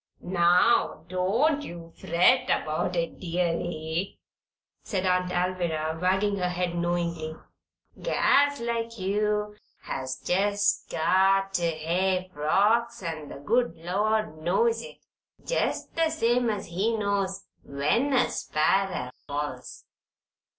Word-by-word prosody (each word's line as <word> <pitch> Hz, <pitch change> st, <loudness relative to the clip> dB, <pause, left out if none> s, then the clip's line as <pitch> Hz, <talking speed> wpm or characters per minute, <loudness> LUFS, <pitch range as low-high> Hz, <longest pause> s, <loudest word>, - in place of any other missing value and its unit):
"Now, 175 Hz, +4 st, +3 dB
don't 225 Hz, +12 st, +1 dB
you 170 Hz, -, -9 dB
fret 180 Hz, +10 st, +3 dB
about 155 Hz, +4 st, -1 dB
it, 170 Hz, -1 st, -2 dB
deary," 170 Hz, 0 st, -2 dB, 0.6 s
said 190 Hz, -3 st, -2 dB
Aunt 180 Hz, 0 st, +1 dB
Alviry, 170 Hz, -3 st, -1 dB
wagging 190 Hz, +2 st, +1 dB
her 180 Hz, -1 st, 0 dB
head 180 Hz, -1 st, -2 dB
knowingly. 170 Hz, -2 st, -2 dB, 0.7 s
"Gals 285 Hz, 0 st, +3 dB
like 230 Hz, 0 st, -3 dB
you 210 Hz, +2 st, -1 dB, 0.3 s
has 130 Hz, 0 st, -4 dB
jest 205 Hz, +5 st, +1 dB
got 195 Hz, +4 st, +2 dB
ter 170 Hz, -2 st, +1 dB
hev 185 Hz, +3 st, 0 dB
frocks, 215 Hz, +9 st, +1 dB
an' 155 Hz, -4 st, -5 dB
the -, -, -8 dB
good 225 Hz, -, +1 dB
Lord 205 Hz, +2 st, -1 dB
knows 225 Hz, +7 st, +2 dB
it, -, -, -11 dB, 0.5 s
jest -, -, -1 dB
the 330 Hz, -1 st, +2 dB
same 245 Hz, -6 st, +1 dB
as 205 Hz, -2 st, -2 dB
He 205 Hz, +7 st, -1 dB
knows 195 Hz, -2 st, -1 dB, 0.2 s
when 150 Hz, -, 0 dB
a 255 Hz, -, +4 dB
sparrer 155 Hz, -4 st, 0 dB, 0.2 s
falls. 145 Hz, -3 st, -5 dB
185 Hz, 115 wpm, -27 LUFS, 170-210 Hz, 0.7 s, a